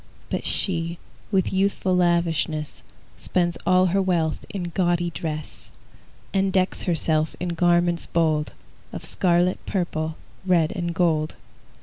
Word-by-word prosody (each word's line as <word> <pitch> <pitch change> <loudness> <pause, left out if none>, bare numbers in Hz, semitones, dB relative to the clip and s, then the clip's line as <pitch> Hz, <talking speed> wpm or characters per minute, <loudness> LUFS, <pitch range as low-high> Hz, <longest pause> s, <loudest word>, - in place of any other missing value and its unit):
But - - -2
she, 170 -2 +2 0.3
with 195 -2 +1
youthful 190 -1 +1
lavishness, 170 -3 0 0.4
Spends 175 -2 0
all 185 0 +5
her 195 - +3
wealth 170 -4 0
in 175 -4 -4
gaudy 175 -2 +1
dress, 155 -2 -5 0.6
And 195 0 +2
decks 185 0 +1
herself 160 -2 0
in 180 - -2
garments 175 0 +2
bold 155 -3 +1 0.4
Of - - -7
scarlet, 175 0 +1
purple, 160 -4 -2 0.3
red, 175 -4 +3
and 170 -2 -3
gold. 160 -3 +1
175 Hz, 120 wpm, -24 LUFS, 165-185 Hz, 0.6 s, all